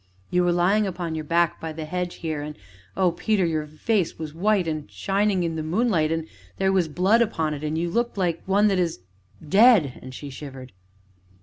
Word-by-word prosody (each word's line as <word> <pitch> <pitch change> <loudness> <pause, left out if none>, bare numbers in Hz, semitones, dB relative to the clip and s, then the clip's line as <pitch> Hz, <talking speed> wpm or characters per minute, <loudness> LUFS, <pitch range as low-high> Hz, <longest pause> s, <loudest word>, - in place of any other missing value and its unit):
"You 180 0 +3
were 175 - +3
lying 190 +5 +2
upon 175 -3 -4
your 160 -1 -3
back, 170 +1 +1
by 160 -1 -4
the 155 0 -6
hedge 180 +2 -3
here, 155 -2 -2
and 150 +1 -6 0.4
oh, 185 -2 +3
Peter! 195 +2 +1
your 155 -2 -1
face 180 +5 -1
was 155 -2 -6
white 190 +1 +1
and 155 -6 -3
shining 195 - 0
in 165 -1 -2
the - - -2
moonlight 165 -1 +1
and 165 -1 -2 0.3
there 190 0 +2
was 185 -3 +2
blood 190 +9 +3
upon 160 -9 0
it, 145 0 -6
and 155 +1 -2
you 170 +1 0
looked 235 +5 -1
like 175 -3 0
one 200 +2 +4
that 195 -2 +1
is 170 - -1 0.5
dead!" 195 - +5
and 130 - -9
she 145 +1 -8
shivered. 130 -2 -9
170 Hz, 205 wpm, -24 LUFS, 155-195 Hz, 0.5 s, dead